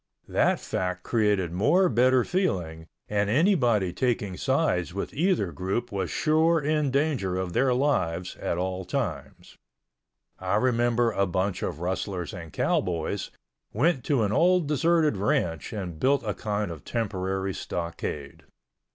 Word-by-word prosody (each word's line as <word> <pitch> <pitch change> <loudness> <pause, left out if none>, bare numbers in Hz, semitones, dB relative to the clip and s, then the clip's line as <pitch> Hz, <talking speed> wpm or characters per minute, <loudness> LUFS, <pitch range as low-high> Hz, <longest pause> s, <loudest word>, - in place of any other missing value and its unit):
That - - +2
fact 90 0 -3
created 105 -6 +1
more 150 - +3
bitter 125 0 +4
feeling 90 - -2 0.2
and 105 -1 0
anybody 120 - +3
taking 110 -6 -1
sides 130 - 0
with 100 - -4
either 165 - +1
group 95 +8 -3
was 100 -2 -2
sure 160 +2 +3
in 150 -1 +1
danger 135 -10 0
of 95 -2 -3
their 130 +4 +3
lives 95 - 0
at 85 - -2
all 95 +1 -2
times. 105 - -5 0.8
I 95 +1 -1
remember 120 0 +2
a 100 -2 +1
bunch 95 +2 -1
of 80 - -4
rustlers 90 +1 -3
and 85 -4 -8
cowboys, 85 +1 -1 0.4
went 135 +3 +2
to 135 -6 +2
an 105 - 0
old 180 +8 +3
deserted 155 -3 +2
ranch 85 -5 0
and 90 -7 -5
built 140 +2 +2
a 105 -2 -2
kind 105 -2 -2
of 80 -5 -9
temporary 95 -4 -2
stockade. 85 -6 -5
105 Hz, 140 wpm, -26 LUFS, 90-135 Hz, 0.8 s, bitter